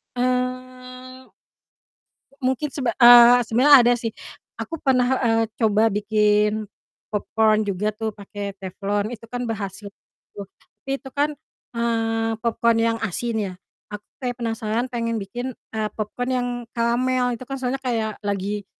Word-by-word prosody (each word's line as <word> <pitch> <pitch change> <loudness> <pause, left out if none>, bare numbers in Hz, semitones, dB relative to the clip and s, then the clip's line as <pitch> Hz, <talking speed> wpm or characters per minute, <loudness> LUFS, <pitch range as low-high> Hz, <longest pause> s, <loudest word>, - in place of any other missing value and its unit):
Eee, 255 +1 -4 1.1
mungkin 265 +2 -1
sebe 255 -3 -2
eee, 240 0 +8
sebenernya 255 +6 +5
ada 240 +1 +4
sih. 225 -2 -4 0.5
Aku 330 - -5
pernah, 255 -4 +2 0.2
eee, 225 -1 +2 0.2
coba 220 -1 +3
bikin 210 +1 +1 0.4
popcorn 215 +1 +1
juga 200 +1 -1
tuh 220 0 -3
pakai 200 0 -7
teflon, 200 +2 -2
itu 235 -2 -9
kan 245 +1 -5
berhasil 205 -2 -5 0.5
tuh. 200 - -6 0.4
Tapi 270 - -6
itu 265 - -10
kan, 290 +3 0 0.4
eee, 225 -1 0
popcorn 230 0 +2
yang 230 0 +1
asin 225 +2 -2
ya, 200 -3 -2 0.4
aku 210 0 -8 0.2
kayak 250 -2 -3
penasaran 225 0 -2
pengen 230 -1 -2
bikin, 240 +5 -5 0.2
eee, 220 -1 -1
popcorn 235 +4 -3
yang 250 -1 0 0.3
karamel, 245 +2 +1
itu 235 - -9
kan 270 - -4
soalnya 260 0 -3
kayak 225 -5 -2
lagi, 205 0 -3
230 Hz, 135 wpm, -22 LUFS, 215-250 Hz, 1.1 s, eee